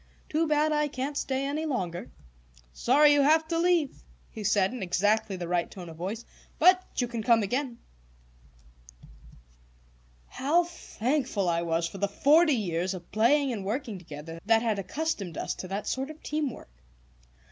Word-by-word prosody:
Too 320 +1 +1
bad 305 0 +2
I 300 0 +2
can't 275 +1 -4
stay 270 -1 -1
any 305 +3 -2
longer." 180 - -3 0.6
"Sorry 290 - +5
you 290 - +4
have 315 +3 +4
to 330 -1 0
leave," 340 -5 +1 0.3
he 215 - -7
said, 205 +1 +2
in 255 - -6
exactly 205 +3 +1
the 175 -2 -5
right 175 0 0
tone 180 -3 -9
of 160 - -11
voice. 200 +7 -5 0.3
"But 365 0 +6 0.2
you 245 - +1
can 235 -1 -4
come 230 -1 +4
again." 245 +3 -2 2.5
How 305 - +1
thankful 260 - -2
I 170 -1 +1
was 165 0 0
for 195 - -9
the 200 - +1
forty 300 - +4
years 185 -3 -1
of 175 -2 -11
playing 260 +5 +3
and 205 -4 -4
working 215 -1 -3
together 165 0 -9
that 225 0 +4
had 220 -3 0
accustomed 200 - -3
us - - -2
to 185 - -7
that 195 +3 -4
sort 265 +2 -2
of 310 0 -11
team 300 -1 -1
work! 145 - -12
235 Hz, 170 wpm, -28 LUFS, 190-295 Hz, 2.5 s, But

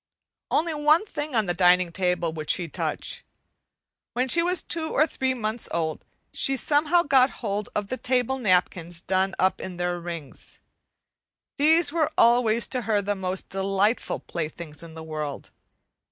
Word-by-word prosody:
Only 325 +1 +1
one 305 +5 +3
thing 300 - -5
on 220 -2 +2
the 175 - -1
dining 180 -1 +4
table 180 -2 -1
would 155 -1 -7
she 175 -2 +1
touch. - - -4 0.9
When 250 +2 0
she 335 - +6
was 360 +1 +1
two 320 -2 -1
or 305 - +3
three 260 -4 -2
months 220 -1 -2
old, 160 -2 -2 0.3
she 270 0 +2
somehow 305 +5 +2
got 265 -3 +4 0.2
hold 205 0 -2
of 205 -1 -2
the 255 - -3
table 255 +1 0
napkins 180 -5 +1
done 190 +2 0
up 190 - +1
in 180 -2 -7
their 175 0 -1
rings. 170 -5 -8 1.0
These 310 +1 +4
were 320 -3 +1
always 235 -1 +4
to 255 - -1
her 210 -2 +3
the 205 +1 -1
most 190 -1 -4
delightful 195 +3 0
playthings 155 -2 -6
in 165 -1 -11
the 160 - -8
world. 155 -3 -6
205 Hz, 160 wpm, -25 LUFS, 175-270 Hz, 1.0 s, she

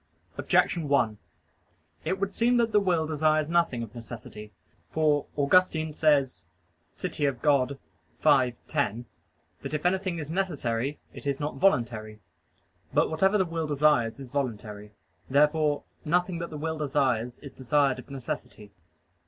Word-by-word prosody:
Objection 165 -4 +1
1: 115 -7 +2 0.9
It 185 +4 -1
would 195 0 -2
seem 240 +3 +2
that 230 -1 +2
the 210 - +5
will 175 -5 +1
desires 155 0 +1
nothing 170 -8 +1
of 110 - -9
necessity. 115 -3 -9 0.4
For 150 -2 +1
Augustine 160 +1 +3
says 140 - +2 0.5
(De - - -3
Civ. 140 -5 0
Dei 140 -4 +4 0.6
v, 130 -5 +4
10) 125 -6 -1 0.6
that - - -6
it 150 - -4
anything 185 -1 0
is 155 -1 -5
necessary, 145 -8 -1 0.2
it - - -8
is 140 -1 -1
not 150 0 -3
voluntary. 115 - +1 0.7
But - - +2
whatever 190 +6 +3
the 190 - +2
will 165 -2 -3
desires 145 -5 +2
is 130 -3 -9
voluntary. 105 -6 -4 0.4
Therefore 150 +1 +3 0.2
nothing 175 +2 0
that 170 - -4
the 155 - -7
will 160 +1 -3
desires 130 -5 0
is 140 - -11
desired 135 0 +1
of 130 - -12
necessity. 120 -5 -6
145 Hz, 145 wpm, -27 LUFS, 125-160 Hz, 0.9 s, the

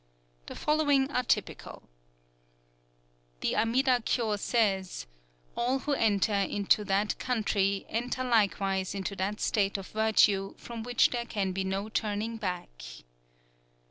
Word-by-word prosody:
The - - -7
following 290 -3 +2
are 250 - +1
typical: 245 - -2 1.6
"_The - - 0
Amida 250 +2 +2
Kyō 220 -4 0
says: 195 -5 0 0.5
'All 250 +3 +1
who 285 +2 -2
enter 215 -4 +2
into 200 +1 +2
that 200 +2 0
country 200 -5 0
enter 245 +3 -2
likewise 195 -5 +1
into 200 0 -3
that 200 +3 -2
state 200 -2 +1
of 195 - -8
virtue 215 -3 +2
from 235 -1 -7
which 245 +1 +3
there 240 -1 -2
can 195 -3 -1
be 190 +1 -2
no 195 +2 -2
turning 220 +1 -2
back. 180 - -5
210 Hz, 125 wpm, -29 LUFS, 195-240 Hz, 1.6 s, which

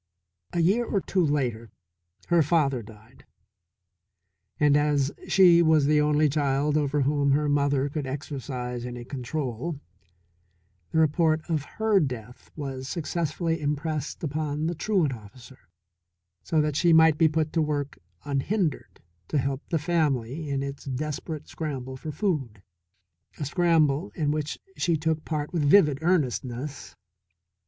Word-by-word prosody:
A 170 - 0
year 200 +8 +3
or 210 -4 0
two 185 -1 0
later 125 -7 -1 0.6
her 170 -1 +5
father 145 -5 +2
died, 110 +3 -16 1.4
and 145 -1 +4
as 145 -1 +2 0.2
she 175 -3 +6
was 160 -3 +4
the 150 +1 +4
only 150 +1 +3
child 145 0 +1
over 145 -1 +1
whom 140 0 +2
her 150 +1 +1
mother 145 -1 +2
could 145 -1 -4
exercise 130 -3 -5
any 120 -1 -6
control, 135 +2 -4 1.1
the - - -2
report 160 0 +3
of 155 -4 -1
her 220 -2 +3
death 125 - -5
was 135 -3 -5
successfully 165 0 -2
impressed 150 +1 -3
upon 155 0 -2
the 170 - 0
truant 175 -5 +1
officer, 120 -1 -14 0.7
so 160 -2 +1
that 150 -1 -1
she 170 +2 +4
might 160 -1 +6
be 165 - +6
put 155 0 -1
to 165 - +2
work 145 -2 -2 0.3
unhindered 150 +4 -2 0.3
to - - -1
help 135 0 -1
the 165 - +1
family 150 -3 -1
in 140 -1 -1
its 140 0 -6
desperate 150 +3 -4
scramble 135 -5 -5
for 155 +4 -6
food, 140 - -2 0.7
a 145 - -3
scramble 155 - +2
in 145 -2 0
which 150 0 -2 0.2
she 170 -2 +1
took 160 0 -1
part 150 +1 -3
with 170 - 0
vivid 150 -2 +5
earnestness. 140 -5 -1
150 Hz, 140 wpm, -26 LUFS, 135-160 Hz, 1.4 s, she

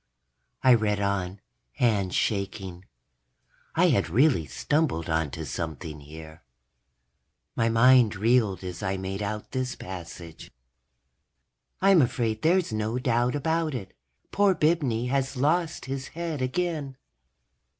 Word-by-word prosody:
I 130 - +7
read 105 -3 +1
on, 100 -1 -2 0.3
hands 100 - +1
shaking. 95 -3 -2 0.9
I - - +4
had - - +1
really 125 - +3
stumbled 120 - -1
onto 80 0 -1
something 80 -1 -5
here. 80 +2 -12 1.1
My 115 - +2
mind 115 -1 +5
reeled 110 -2 +2
as 90 -1 -6
I 95 0 -1
made 95 +1 -4
out 105 +1 -4
this 130 -1 -2
passage: 85 -2 -9
_... - - -23 1.3
I'm 195 -3 +6
afraid 115 -3 0
there's 170 -4 +2
no 110 +2 -1
doubt 125 0 +1
about 160 0 0
it. 95 -6 -7 0.4
Poor 200 -1 +3
Bibney 145 -9 +1
has 135 0 -1
lost 160 +4 0
his 135 0 -4
head 165 -3 -4
again. 145 0 -2
115 Hz, 120 wpm, -26 LUFS, 95-140 Hz, 1.3 s, I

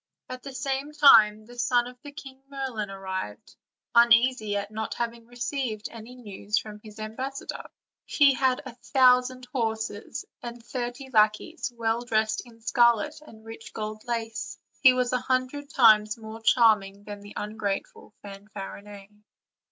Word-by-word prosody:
At 255 0 -7
the 275 0 -9
same 275 +2 -3
time 215 -8 +6
the 245 +1 -12
son 240 0 +2
of 250 +1 -9
the 290 - -9
great 285 - -17
King 270 -3 -10
Merlin 260 -7 -4
arrived, 190 - -6 0.4
uneasy 235 -2 +4
at 200 +1 -4
not 220 0 -4
having 235 -1 -4
received 245 -2 -3
any 230 +2 -11
news 210 -3 -3
from 210 -1 -5
his 215 0 -12
ambassador. 260 +6 -6 0.4
He 285 -2 +5
had 260 +1 +1
a 255 - -8
thousand 255 0 +3
horses, 220 -4 -3 0.2
and 235 -1 -8
thirty 245 +2 -5
lackeys, 215 +6 +1
well 225 0 0
dressed 220 -2 0
in 230 -1 -17
scarlet 240 +5 +2
and 220 -7 -16
rich 225 0 -10
gold 215 0 -5
lace; 230 -1 -4 0.2
he 260 - +8
was 250 -1 0
a 250 - +2
hundred 260 +3 -2
times 215 -6 +5
more 220 0 -9
charming 210 -4 +3
than 205 -1 -8
the 205 0 -12
ungrateful 210 -1 -4
Fanfarinet. 200 0 -10
230 Hz, 150 wpm, -26 LUFS, 215-255 Hz, 0.4 s, he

